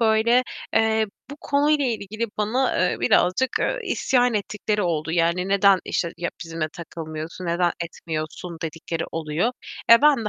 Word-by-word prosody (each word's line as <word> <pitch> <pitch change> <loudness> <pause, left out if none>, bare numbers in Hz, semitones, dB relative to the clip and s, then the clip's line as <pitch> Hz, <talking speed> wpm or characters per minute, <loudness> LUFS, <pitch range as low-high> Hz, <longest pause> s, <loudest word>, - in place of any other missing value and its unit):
böyle, 225 +2 +4 0.3
eee, 220 0 +3 0.2
bu 285 - -7
konuyla 290 0 +2
ilgili 220 -1 -2
bana, 240 +5 +1
eee, - - -4
birazcık, 185 +9 +2
ııı, - - 0
isyan 250 - +2
ettikleri 210 0 -1
oldu. 160 -3 -1
Yani, 170 +2 +1
"Neden, 200 -1 +5
işte, 170 -1 -1
ya 175 - -2
bizimle 165 -1 -3
takılmıyorsun, 165 +1 -7
neden 170 +1 +1
etmiyorsun?" 165 0 -5
dedikleri 165 0 -4
oluyor. 165 +8 -1 0.4
Eee, 230 +3 +9
ben 290 -6 +5
de - - 0
195 Hz, 145 wpm, -24 LUFS, 165-230 Hz, 0.4 s, Eee